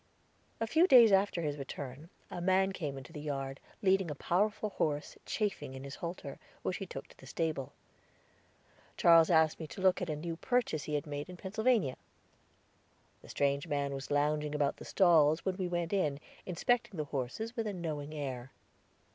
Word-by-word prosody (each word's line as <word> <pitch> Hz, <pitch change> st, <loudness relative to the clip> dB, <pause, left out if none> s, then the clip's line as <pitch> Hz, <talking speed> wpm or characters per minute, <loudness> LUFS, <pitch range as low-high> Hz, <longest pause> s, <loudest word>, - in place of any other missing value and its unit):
A 225 Hz, -, +1 dB
few 320 Hz, +10 st, +4 dB
days 235 Hz, -, +8 dB
after 195 Hz, -3 st, +3 dB
his 145 Hz, -1 st, -2 dB
return, 140 Hz, +2 st, -7 dB, 0.2 s
a 175 Hz, -, -4 dB
man 190 Hz, +2 st, +3 dB
came 150 Hz, -7 st, -4 dB
into 135 Hz, +5 st, -10 dB
the 150 Hz, -, -6 dB
yard, 135 Hz, -2 st, -4 dB, 0.2 s
leading 190 Hz, -2 st, +3 dB
a 150 Hz, -, -4 dB
powerful 205 Hz, +7 st, 0 dB
horse 150 Hz, -5 st, -1 dB
chafing 205 Hz, -, -2 dB
in 130 Hz, -, -8 dB
his 140 Hz, 0 st, -7 dB
halter, 170 Hz, -5 st, -6 dB, 0.2 s
which -, -, -1 dB
he -, -, -6 dB
took -, -, -7 dB
to -, -, -18 dB
the -, -, -14 dB
stable. 155 Hz, -5 st, -2 dB, 1.3 s
Charles 165 Hz, -1 st, +7 dB
asked 160 Hz, -2 st, +4 dB
me 160 Hz, -, -5 dB
to 190 Hz, -, -9 dB
look 185 Hz, 0 st, +3 dB
at 180 Hz, -, -2 dB
a 155 Hz, -, -1 dB
new 165 Hz, +2 st, -5 dB
purchase 245 Hz, -, 0 dB
he 150 Hz, -, -2 dB
had 145 Hz, -, -1 dB
made 145 Hz, +2 st, -5 dB
in 180 Hz, -, -9 dB
Pennsylvania. 215 Hz, -, +1 dB, 1.2 s
The -, -, -15 dB
strange 140 Hz, +2 st, 0 dB
man 140 Hz, -2 st, -1 dB
was 135 Hz, 0 st, -6 dB
lounging 150 Hz, +1 st, +1 dB
about 145 Hz, -1 st, +1 dB
the -, -, -10 dB
stalls 160 Hz, -4 st, +4 dB
when 190 Hz, -1 st, -1 dB
we 185 Hz, -2 st, -1 dB
went 175 Hz, 0 st, -2 dB
in, 150 Hz, -8 st, +1 dB, 0.3 s
inspecting 195 Hz, +3 st, 0 dB
the 155 Hz, -, -1 dB
horses 145 Hz, -, -3 dB
with 225 Hz, -3 st, -2 dB
a 205 Hz, -, -2 dB
knowing 155 Hz, -5 st, -4 dB
air. 130 Hz, -4 st, -4 dB
160 Hz, 185 wpm, -32 LUFS, 145-190 Hz, 1.3 s, days